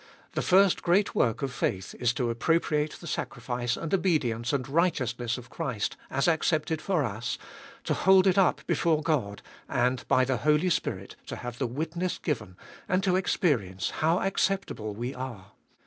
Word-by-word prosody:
The - - -1
first 190 0 +4
great 190 +4 +2
work 115 +3 +1
of 135 -2 -2
faith 95 -5 -2
is 120 -2 +2
to 120 -1 0
appropriate 150 +4 +1
the - - -11
sacrifice 120 -5 -3
and 165 - -4
obedience 135 -11 +1
and 135 -4 -1
righteous 150 -5 +1
ness 120 0 -1
of 125 0 -11
Christ 115 -6 -2
as 135 +4 +1
accepted 160 -1 +1
for 180 -6 +1
us, 115 +2 -3 0.5
to - - 0
hold 190 0 +5
it 190 -2 +4
up 195 -2 +3
before 155 -2 +1
God, 125 -11 -1 0.3
and 125 +1 +1
by 130 - +4
the 130 -1 0
Holy 150 +8 +2
Spirit - - -2
to - - -5
have 120 -1 -7
the 130 - 0
witness 165 +8 -3
given, 110 - -3 0.3
and 185 +1 +2
to 185 -2 +2
experience 135 - 0
how 165 +3 +1
acceptable 190 - -1
we 120 +4 -4
are. 120 -7 -7
140 Hz, 170 wpm, -28 LUFS, 120-170 Hz, 0.5 s, hold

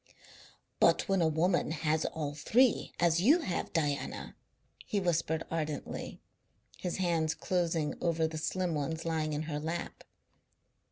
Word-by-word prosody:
"But - - +4
when 195 -2 +2
a 165 - +4
woman 165 +3 +2
has 155 0 0
all 150 -2 -3
three, 235 - +3
as 170 0 +3
you 295 - +5
have, 185 - -2
Diana," 145 -4 -2 0.5
he 205 - -1
whispered 165 -3 0
ardently, 155 -2 -4 0.6
his 180 - -3
hands 165 -4 +1
closing 165 -4 0
over 165 -1 +1
the 160 0 -5
slim 180 +1 -1
ones 160 +2 -2
lying 160 -2 -1
in 150 +1 -2
her 150 -2 -3
lap. 165 +3 -4
165 Hz, 135 wpm, -31 LUFS, 155-175 Hz, 0.6 s, you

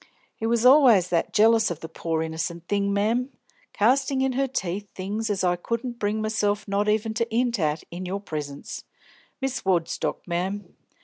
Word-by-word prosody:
He 225 - -3
was 235 +1 +1
allus 250 - +7
that 170 -2 0
jealous 225 +1 +4
of 170 -2 -5
the 160 - -6
pore 160 0 -2
innocent 165 +1 -4
thing, 200 -1 +1
mem 225 +6 +1 0.4
castin' 265 +5 +2
in 265 - +1
her 270 +2 0
teeth 200 -5 -3
things 210 +4 -3
as 195 -2 -1
I 180 -1 +3
couldn't 235 +6 -4
bring 215 +1 -1
myself 215 -1 0
not 200 +1 +1
even 220 +1 +1
to 230 +1 -2
'int 240 -1 +1
at 155 -1 0
in 180 +2 -5
your 195 +2 -2
presence, 150 -7 -6 0.6
Miss 270 -1 -2
Woodstock, 175 -4 -1
mem. 185 +4 -3
205 Hz, 175 wpm, -25 LUFS, 175-230 Hz, 0.6 s, allus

